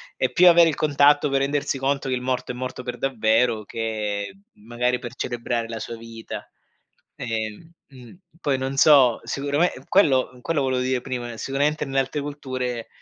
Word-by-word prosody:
è - - 0
più 180 0 +5
avere 170 -1 +7
il 150 - -2
contatto 145 0 +4
per 135 0 +1
rendersi 140 0 -1
conto 135 0 -1
che 130 - 0
il 125 - -4
morto 125 -1 -2
è - - -9
morto 130 0 -5
per 125 - -5
davvero, 110 -3 +1
che 105 - -3 0.2
magari 120 +3 -2
per 120 +1 -8
celebrare 120 -1 -3
la 115 -1 -6
sua 115 - -6
vita. 115 0 -9 0.7
Ehm 115 +6 -4 0.2
mh, 125 -4 -14 0.3
poi 135 -2 +2
non 135 +1 -3
so, 135 -6 +6
sicurame 145 +5 0 0.2
quello 130 -9 +3
quello 160 0 0
volevo 130 -1 0
dire 130 0 0
prima, 120 -2 -5
sicuramente 145 +4 -1
nelle 135 0 0
altre 135 +3 -1
culture 130 -5 -4
130 Hz, 170 wpm, -23 LUFS, 120-140 Hz, 0.7 s, avere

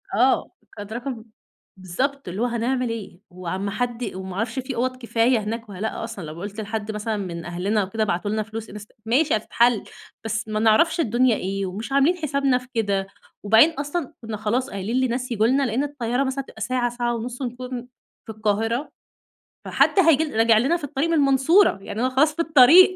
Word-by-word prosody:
آه، 255 +5 +2 0.3
كانت 205 +1 -7
رقم 240 -1 -5 0.6
بالضبط 265 +10 -3
اللي 185 +5 -4
هو - - +3
هنعمل 245 +1 -1
إيه؟ 220 -6 -6
وعلى 185 0 -5
ما 200 - -2
حد 245 +1 -2
وما 190 -1 -6
عرفش 225 +4 -2
في 260 0 -5
أُوَض 255 +2 -1
كفاية 235 0 +2
هناك 220 +1 -5
والّا 195 -1 -8
لأ 220 - -3
أصلًا، 225 -5 -6
لو 155 +2 -8
قُلت 205 +2 -5
لحد 215 0 -4
مثلًا 210 +1 -3
من 170 -4 -5
أهلنا 190 +5 0
وكده 215 +4 -2
ابعتولنا 205 +3 -1
فلوس 220 +1 -7
انست 210 0 -10
ماشي 275 +6 +2
هتتحل، 230 +1 +2 0.4
بس 220 0 -2
ما 215 0 -2
نعرفش 225 +11 +4
الدنيا 245 -3 +3
إيه 195 0 -3
ومش 200 +7 -6
عاملين 280 +6 +4
حسابنا 280 -5 +1
في 250 0 -9
كده، 200 -4 0 0.4
وبعدين 220 +9 +6
أصلًا 290 0 -4
كنا 225 -2 -5
خلاص 235 +6 -1
قايلين 200 +2 -4
لناس 250 +1 -2
ييجوا 220 -1 +2
لنا، 270 +3 +2
لأن 250 +1 0
الطيارة 265 -3 -1
مثلًا 270 0 -2
هتبقى - - -14
ساعة، 250 -1 0
ساعة 240 0 -2
ونص 245 +3 -6
ونكون 250 0 -5 0.4
في - - -7
القاهرة، 220 +5 -1 0.7
فحد - - +3
هييجي 320 -4 +5
راجع 225 0 +5
لنا 270 +10 +2
في 340 - -14
الطريق 285 +2 -1
من - - +1
المنصورة، 285 - +4
يعني 205 - -6
أنا 255 - +2
خلاص 295 +4 +2
في 335 - 0
الطريق. 330 +5 +7
235 Hz, 190 wpm, -23 LUFS, 210-265 Hz, 0.7 s, الطريق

